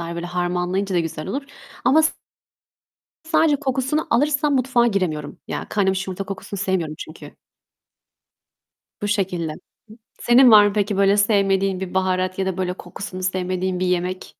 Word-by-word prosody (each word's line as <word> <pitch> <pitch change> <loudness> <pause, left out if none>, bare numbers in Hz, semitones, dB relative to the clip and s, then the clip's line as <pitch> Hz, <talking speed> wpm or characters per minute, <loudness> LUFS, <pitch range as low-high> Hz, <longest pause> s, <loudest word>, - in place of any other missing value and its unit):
böyle 170 +1 -5
harmanlayınca 180 +2 -1
da - - +3
güzel 165 -2 -5
olur 275 +9 -3 0.4
ama 295 +6 +5
s 315 - +2 1.1
sadece 320 -2 +3
kokusunu 270 +2 -1
alırsam 290 +3 +2
mutfağa 255 -2 +2
giremiyorum. 175 -9 -2
Ya - - -4
kaynamış 195 -2 0
yumurta 190 +1 -4
kokusunu 195 0 -6
sevmiyorum 180 -5 -1
çünkü. 155 - -10 1.7
Bu 205 - -1
şekilde. 180 -6 -1 0.7
Senin 245 0 +6
var 210 -1 +9
mı 200 - -2
peki 205 -1 0
böyle 200 +1 +4
sevmediğin 195 -2 +2
bir 190 -1 -6
baharat 185 0 0
ya 190 - 0
da 190 -1 -2
böyle 180 -1 -1
kokusunu 185 -1 -8
sevmediğin 185 0 -1
bir 185 - 0
yemek? 180 +1 -2
190 Hz, 145 wpm, -21 LUFS, 180-215 Hz, 1.7 s, var